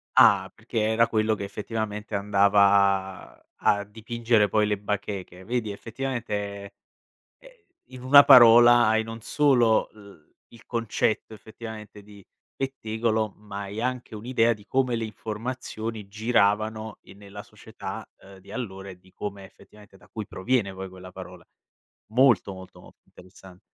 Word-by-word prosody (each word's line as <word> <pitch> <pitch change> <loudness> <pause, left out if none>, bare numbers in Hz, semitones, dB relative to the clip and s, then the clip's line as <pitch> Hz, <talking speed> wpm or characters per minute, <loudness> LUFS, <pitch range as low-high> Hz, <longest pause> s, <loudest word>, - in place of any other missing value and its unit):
Ah, - - +5
perché - - -8
era 115 +1 +3
quello 110 0 +1
che 105 - -5
effettivamente 105 +1 -5
andava 100 -1 +2
a 100 0 +1
dipingere 115 +1 0
poi 105 0 +1
le 105 -1 0
bacheche. 100 -2 -5
Vedi 110 0 -2
effettivamente, 105 -4 -5 0.7
ehm, - - -16 0.4
in 125 -1 -12
una 140 +2 +8
parola 120 0 +8
hai 110 0 +2
non 115 0 -9
solo 120 -4 +2
l 100 -7 -17 0.3
il 115 - -17
concetto 115 -1 -2
effettivamente 110 -1 -10
di 100 -1 -16 0.3
pettegolo, 110 -5 -2
ma 100 -1 -8
hai 100 +3 -6
anche 125 -2 -4
un'idea 115 +1 +1
di 105 -2 -16
come 130 -1 0
le 115 - -3
informazioni 110 -1 -6
giravano 110 0 0
in 95 - -16
nella 100 0 -11
società, 110 -2 -9
ehm, 95 0 -15
di 95 - -16
allora 95 -6 -6
e 95 - -11
di 95 +1 -23
come 100 0 -7
effettivamente 105 +1 -18
da - - -21
cui 110 -2 -7
proviene 105 0 -1
poi 95 0 -7
quella 95 0 -12
parola. 90 -2 -11 0.7
Molto, 120 -5 +3
molto, 95 0 -13
molto - - -18
interessan 95 0 -17
105 Hz, 140 wpm, -25 LUFS, 100-115 Hz, 0.7 s, una